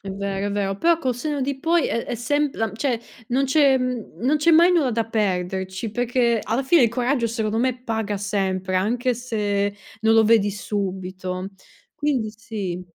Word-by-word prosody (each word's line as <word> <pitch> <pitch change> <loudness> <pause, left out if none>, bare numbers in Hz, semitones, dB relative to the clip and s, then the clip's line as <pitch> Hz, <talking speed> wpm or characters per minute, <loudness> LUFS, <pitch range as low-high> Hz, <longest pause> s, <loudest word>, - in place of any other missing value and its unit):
È 195 - -9
vero, 200 0 -3
è - - -2
vero, 195 -1 -1
però, 335 +5 +4
col 260 -6 0
senno 290 +4 -3
di 270 0 -2
poi, 330 +2 +2
è 230 - -1
è - - -4
sem 290 +5 0
la 225 -2 -2
cioè 235 +1 -1 0.3
non 265 +3 +2
c'è 275 -1 +4
non 255 +2 -1
c'è 315 +3 +3
mai 340 +3 +7
nulla 295 -9 +2
da 230 0 0
perderci, 190 -1 -2
perchéc, 240 0 +1
alla 230 +5 0
fine, 285 +1 +4
il 235 - +5
coraggio 245 +1 0
secondo 225 -1 -1
me 250 0 0
paga 220 -3 -2
sempre, 190 -2 -1
anche 240 +7 +1
se 205 -4 -1 0.3
non 225 0 +4
lo 225 - +6
vedi 215 -2 +3
subito. 185 -2 -4 0.5
Quindi 260 -7 0
sì. 210 -6 -5
225 Hz, 180 wpm, -23 LUFS, 200-255 Hz, 0.5 s, mai